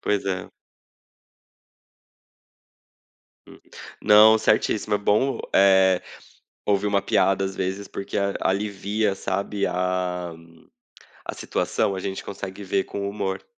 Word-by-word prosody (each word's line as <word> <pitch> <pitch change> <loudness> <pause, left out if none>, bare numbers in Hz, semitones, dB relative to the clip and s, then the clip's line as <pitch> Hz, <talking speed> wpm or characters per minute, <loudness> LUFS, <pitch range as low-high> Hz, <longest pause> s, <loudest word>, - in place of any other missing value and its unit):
Pois 105 -1 0
é. 95 -2 -3 3.0
Hum. - - -15 0.4
Não, 105 +1 +7
certíssimo, 105 -1 +1
é - - -6
bom, 105 +7 +1 0.2
eh, 95 -1 +5 0.6
ouvir 100 0 +1
uma 100 -1 +2
piada, 95 0 +2
às 95 0 -4
vezes, 95 +2 -3
porque 100 - -4
a 100 0 0
alivia, 100 +1 -1
sabe, 100 +1 -2
a 90 -1 -2 1.0
a - - -10
situação, 100 - -1
a 95 - -4
gente 95 0 -5
consegue 100 0 -7
ver 95 0 0
com 100 0 -4
humor. 95 -2 -4
100 Hz, 115 wpm, -24 LUFS, 95-105 Hz, 3.0 s, Não